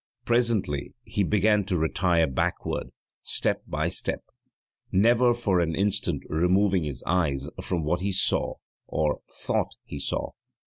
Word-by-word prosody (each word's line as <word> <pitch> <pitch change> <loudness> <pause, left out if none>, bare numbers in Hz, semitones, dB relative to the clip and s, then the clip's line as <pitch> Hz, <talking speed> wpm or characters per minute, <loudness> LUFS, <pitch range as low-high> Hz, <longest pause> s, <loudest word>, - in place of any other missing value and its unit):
Presently 115 - 0
he 110 -3 -2
began 105 +2 +3
to 95 -3 0
retire 85 +1 +2
backward, 65 -4 -2 0.3
step - - +1
by - - -1
step, - - -1 0.7
never 120 +5 +4
for 100 -6 +1
an 80 -2 0
instant 100 0 0
removing 90 +2 +2
his 70 -4 -5
eyes 75 -6 0
from 85 -3 -2
what 85 +4 0
he 100 +2 -1
saw, 95 - +1 0.3
or 75 -1 0
thought - - -2
he - - -7
saw. - - -2
90 Hz, 135 wpm, -26 LUFS, 80-105 Hz, 0.7 s, never